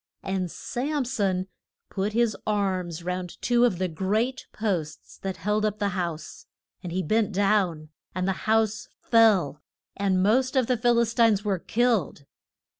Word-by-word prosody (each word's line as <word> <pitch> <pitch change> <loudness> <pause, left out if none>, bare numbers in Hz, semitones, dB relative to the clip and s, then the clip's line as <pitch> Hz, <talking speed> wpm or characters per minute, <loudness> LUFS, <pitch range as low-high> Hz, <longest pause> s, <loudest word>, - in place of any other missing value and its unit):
And 190 -2 -2
Sam 275 - -3
son 195 -6 0 0.5
put 200 +2 -2
his 235 -1 +2
arms 185 -5 -1
round 180 0 -4
two 240 0 +3
of 200 -7 +1
the 185 +1 0
great 210 +10 -1
posts 175 -8 -4
that 190 -1 -4
held 210 +5 0
up 210 -1 0
the 205 -1 0
house. 170 -4 -5 0.3
And 175 - -6
he 185 +2 -1
bent 215 +5 +1
down, 190 -6 +1 0.3
and 185 0 -1
the - - +2 0.2
house 220 -1 +2
fell, 210 - +3 0.3
and 190 -2 +1
most 255 +6 +2
of 260 -2 +3
the 250 - +1
Phil 240 +1 +2
is 235 -1 +2
tines 225 -4 +3
were 195 -3 0
killed. 225 - 0
200 Hz, 160 wpm, -26 LUFS, 185-225 Hz, 0.5 s, two